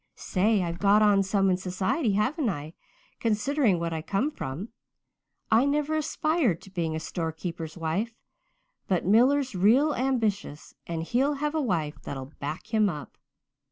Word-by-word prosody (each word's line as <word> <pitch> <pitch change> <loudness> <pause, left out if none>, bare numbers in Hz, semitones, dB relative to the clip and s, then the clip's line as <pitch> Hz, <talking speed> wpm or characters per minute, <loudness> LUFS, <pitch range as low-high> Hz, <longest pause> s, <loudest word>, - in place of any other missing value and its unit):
Say, 205 +1 +1
I've 170 0 -4
got 205 +1 +5
on 205 -2 +5
some 195 0 +2
in 180 - +2
society, 190 - -1
haven't 250 +6 +1
I, 155 -3 -5 0.5
considering 230 - +1
what 170 0 -2
I 160 - -3
come 210 - -1
from? 175 - -6 0.8
I 225 +3 +5
never 295 +2 0
aspired 310 - +1
to 195 - -14
being 165 -4 -2
a - - -2
storekeeper's 165 0 -5
wife. 180 +8 -2 0.7
But 185 -3 0
Miller's 255 +7 +4
real 235 +11 +4
ambitious 220 - -1
and 165 -1 -3
he'll 265 - +1
have 295 +2 -2
a 315 - 0
wife 165 - -2
that'll 135 +1 -7
back 155 +10 -6
him 215 -2 +4
up. 150 -6 -7
200 Hz, 155 wpm, -27 LUFS, 170-255 Hz, 0.8 s, got